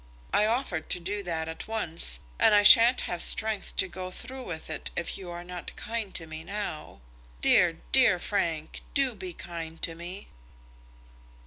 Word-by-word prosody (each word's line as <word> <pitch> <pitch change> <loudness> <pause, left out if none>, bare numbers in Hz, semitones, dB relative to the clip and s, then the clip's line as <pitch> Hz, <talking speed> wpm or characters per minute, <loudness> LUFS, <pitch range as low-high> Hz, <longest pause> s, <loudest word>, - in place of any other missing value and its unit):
I 210 - +4
offered 220 -9 -1
to - - +2
do 200 +4 -3
that 165 -4 -3
at 160 0 -7
once, 165 - 0 0.2
and 210 - +6
I 205 - +5
sha'n't 230 +4 +8
have 175 -1 -3
strength 220 -2 0
to - - +2
go 185 +1 -6
through 255 +6 -6
it 160 -1 -3
if 170 - -2
you 185 -2 -8
are 175 0 -6
not 180 0 -8
kind 225 -3 -4
to 165 - -1
me 160 0 -7
now. 180 - -5 0.4
Dear, - - +5
dear 180 - +6
Frank, 170 -5 -2
do 275 -3 +2
be 185 -3 -7
kind 165 -1 -7
to 165 - 0
me." 175 +4 -8
180 Hz, 170 wpm, -28 LUFS, 165-210 Hz, 0.4 s, sha'n't